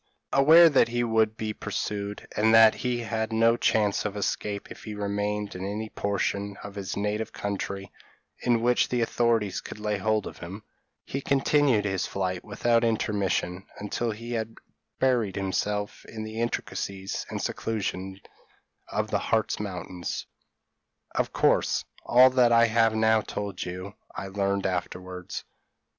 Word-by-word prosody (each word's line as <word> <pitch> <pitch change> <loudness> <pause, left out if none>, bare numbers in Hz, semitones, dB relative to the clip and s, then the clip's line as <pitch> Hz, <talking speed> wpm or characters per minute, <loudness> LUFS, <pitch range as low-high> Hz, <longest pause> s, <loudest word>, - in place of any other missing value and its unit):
Aware 160 +5 +8
that 145 - +4
he 120 +1 0
would 110 -1 +2
be 110 -1 -3
pursued, 105 -1 -4
and 110 +1 +4
that 115 -1 +8
he 125 -1 -2
had 110 -1 -2
no 115 +1 +4
chance 105 -3 +2
of 105 -1 -3
escape 100 0 -2
if - - -10
he 105 -2 -5
remained 105 0 -2
in 90 - -6
any 105 +3 -3
portion 100 0 -2
of 100 - -7
his 100 -1 -5
native 105 +2 -1
country 100 -1 -4 0.5
(in 120 -2 +1
which 125 0 +3
the 125 -1 0
authorities 115 -4 +1
could - - -9
lay 105 -1 -1
hold 110 +1 +1
of - - -8
him), 95 +5 -8 0.4
he 135 - -4
continued 135 -5 +3
his 95 -2 -1
flight 95 -2 -2
without 115 -1 +1
intermission 100 -4 0
until 105 +3 -2
he 115 +2 -6
had 115 -1 -3 0.4
buried 120 -7 +2
himself 105 +2 -2
in 110 -1 -7
the 110 +1 -4
intricacies 100 -4 -3
and - - -4
seclusion 95 -3 -3 0.7
of - - -2
the - - +2
Hartz 110 -1 0
Mountains. 90 -3 -5 0.9
Of - - 0
course, - - +2 0.2
all 130 +2 +7
that 125 -2 +4
I 115 0 +6
have 115 0 +3
now 110 0 +4
told 100 -3 -4
you 90 +2 -6 0.2
I 95 - -5
learned 100 0 0
afterwards. 90 0 -4
105 Hz, 150 wpm, -27 LUFS, 100-115 Hz, 0.9 s, Aware